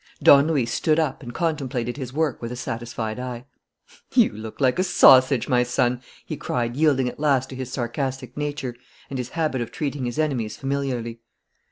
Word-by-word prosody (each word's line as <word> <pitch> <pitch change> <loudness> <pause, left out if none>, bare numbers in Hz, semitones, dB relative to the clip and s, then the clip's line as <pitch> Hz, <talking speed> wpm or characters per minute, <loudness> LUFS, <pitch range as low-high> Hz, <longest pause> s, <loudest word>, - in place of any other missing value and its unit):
Don 140 +1 +7
Luis 135 -8 0
stood 155 -1 +2
up 155 -4 0
and 120 - -7
contemplated 135 -6 -2
his 130 -3 -6
work 155 +1 -1
with 115 0 -5
a - - -4
satisfied 115 -1 -4
eye. 125 -1 -6 0.7
"You - - +5
look 110 +1 -8
like 130 +3 +2
a - - +4
sausage, 130 -8 +6
my 125 -1 +3
son!" 125 0 0 0.2
he - - -4
cried, 120 -1 -2
yielding 140 -4 +3
at 125 - -6
last 135 -3 +1
to - - -6
his 130 -1 -6
sarcastic 130 0 -3
nature 145 -4 -3 0.4
and 135 - -3
his 125 -1 -4
habit 155 -6 0
of 115 - -4
treating 140 -3 -3
his 120 +2 -4
enemies 125 -9 -1
familiarly. 130 -4 -3
130 Hz, 185 wpm, -23 LUFS, 120-140 Hz, 0.7 s, Don